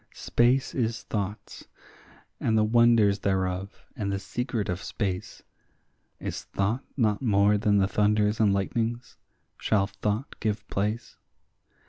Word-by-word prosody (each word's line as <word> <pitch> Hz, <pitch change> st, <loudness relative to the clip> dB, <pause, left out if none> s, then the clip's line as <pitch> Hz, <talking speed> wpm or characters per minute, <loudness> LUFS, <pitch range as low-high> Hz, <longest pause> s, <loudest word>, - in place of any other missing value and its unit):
Space 125 Hz, +3 st, +2 dB
is 115 Hz, -2 st, -1 dB
thought's, 105 Hz, -1 st, -5 dB, 0.7 s
and 110 Hz, -1 st, +1 dB
the 110 Hz, -, +4 dB
wonders 110 Hz, -2 st, +4 dB
thereof, 95 Hz, 0 st, -2 dB
and 100 Hz, -6 st, -2 dB
the 100 Hz, -, 0 dB
secret 115 Hz, +2 st, -3 dB
of 90 Hz, +1 st, -3 dB
space; 95 Hz, -4 st, -4 dB, 0.8 s
Is -, -, -5 dB
thought 110 Hz, +7 st, -1 dB
not 105 Hz, -5 st, +2 dB
more 105 Hz, -4 st, +4 dB
than 105 Hz, 0 st, +2 dB
the 95 Hz, -1 st, +3 dB
thunders 105 Hz, +2 st, +2 dB
and 105 Hz, -3 st, +4 dB
lightnings? 115 Hz, +4 st, -2 dB, 0.4 s
shall 100 Hz, -3 st, +2 dB
thought 105 Hz, +5 st, -3 dB
give 105 Hz, -1 st, -2 dB
place? 105 Hz, +4 st, -2 dB
105 Hz, 125 wpm, -27 LUFS, 100-115 Hz, 0.8 s, the